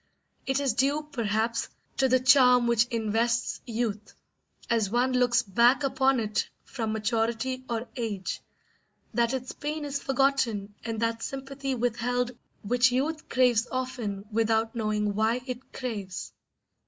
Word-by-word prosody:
It 265 +1 +1
is 275 -5 +1
due, 285 +5 +1
perhaps, 230 -1 -1 0.3
to 265 -1 +3
the 255 +1 +4
charm 250 -1 +6
which 235 0 +3
invests 230 +1 0
youth, 220 -3 -3 0.5
as 225 -4 +1
one 245 +4 +1
looks 250 -1 +3
back 235 +8 +4
upon 270 -1 +2
it 215 -2 -1
from 225 -4 -3
maturity 225 +4 -1
or 235 +1 -2
age, 215 -6 -3 0.7
that 235 +1 +2
its 260 -1 -3
pain 300 +1 -4
is 280 -1 -3
forgotten 260 -7 +1
and 225 -1 -3
that 230 0 0
sympathy 270 0 -4
withheld 245 +1 0 0.3
which 245 +4 +3
youth 305 +5 -1
craves 250 -2 +3
often 245 -6 -3
without 225 0 +1
knowing 210 -2 0
why 220 +4 +1
it 255 0 -7
craves. 205 -8 -5
240 Hz, 135 wpm, -28 LUFS, 225-260 Hz, 0.7 s, charm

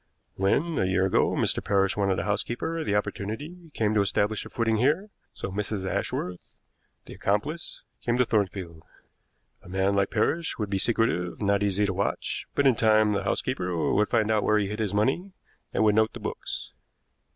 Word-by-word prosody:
When, 140 - +1
a - - +2
year 95 0 +2
ago, 95 - +2
Mr. - - 0
Parrish 95 -1 +2
wanted 100 -2 +1
a - - -1
housekeeper 120 - -2
the 105 - 0
opportunity 145 - -4
came 110 -1 +1
to 105 - +3
establish 100 +2 0
a - - -10
footing 115 -2 +1
here; 155 - +1 0.2
so 95 - -6
Mrs. 100 0 -2
Ashworth, 90 -1 -3 0.5
the - - -10
accomplice, 145 +12 -2 0.2
came 120 0 +1
to 125 - +4
Thornfield. 95 -7 -1 0.8
A - - -14
man 95 +2 +1
like 100 -1 +2
Parrish 165 +1 0
would 105 -3 -3
be 95 - +1
secretive, 110 -6 +1
not 100 -1 +2
easy 100 0 +2
to 100 - -1
watch; 100 +2 -2
but 140 - +2
in 135 - +6
time 110 -1 +4
the 100 -1 -1
housekeeper 90 -6 -1
would 105 +1 +2
find 110 -2 +2
out 110 -1 +3
where 105 +1 +3
he 100 -2 0
hid 105 +1 -4
his 105 -4 0
money, 135 - 0 0.4
and - - +1
would 105 -1 +5
note 110 +1 +3
the - - -7
books. - - -5
105 Hz, 185 wpm, -27 LUFS, 100-115 Hz, 0.8 s, in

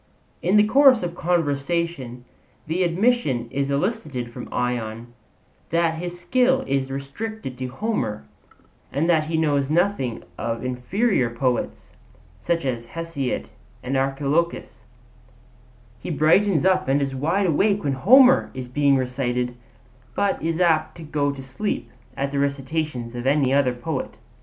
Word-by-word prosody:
In 185 +4 +3
the 210 - +7
course 260 -1 +5
of 175 -1 -3
conversation 160 -6 -1 0.4
the 165 +4 -1
admission 175 - +1
is 140 0 -1
elicited 140 - -2
from - - -9
Ion 120 -1 -3 0.6
that 165 -1 +1
his 175 0 -5
skill 255 +7 +2
is 135 -1 -1
restricted 140 - -5
to 130 - -3
Homer, 125 - -3 0.7
and 145 +5 0
that 160 -3 +3
he 160 +1 -1
knows 145 -3 +1
nothing 160 - 0 0.2
of 115 +1 -3
inferior 130 - 0
poets, 120 +1 -2 0.5
such 170 -4 -1
as 120 -3 -3
Hesiod 165 -6 -3 0.3
and 130 +2 -2
Archilochus; 140 +5 -1 1.2
he - - -7
brightens 170 +2 +3
up 185 0 +3
and 135 +2 +3
is 135 -1 -2
wide 165 +9 0
awake 200 +5 +2
when 140 -2 0
Homer 255 - +6
is 130 -1 -5
being 140 +2 +3
recited, 125 -1 -1 0.6
but 200 -1 0
is 165 +1 -1
apt 160 -3 +2
to 165 - -9
go 145 -2 0
to 135 -1 -8
sleep 135 +11 -4 0.3
at 140 0 -1
the 140 - -1
recitations 140 -3 -2
of 120 +1 -4
any 135 -2 +3
other 135 -3 +2
poet. 130 -3 -4
145 Hz, 140 wpm, -23 LUFS, 130-175 Hz, 1.2 s, the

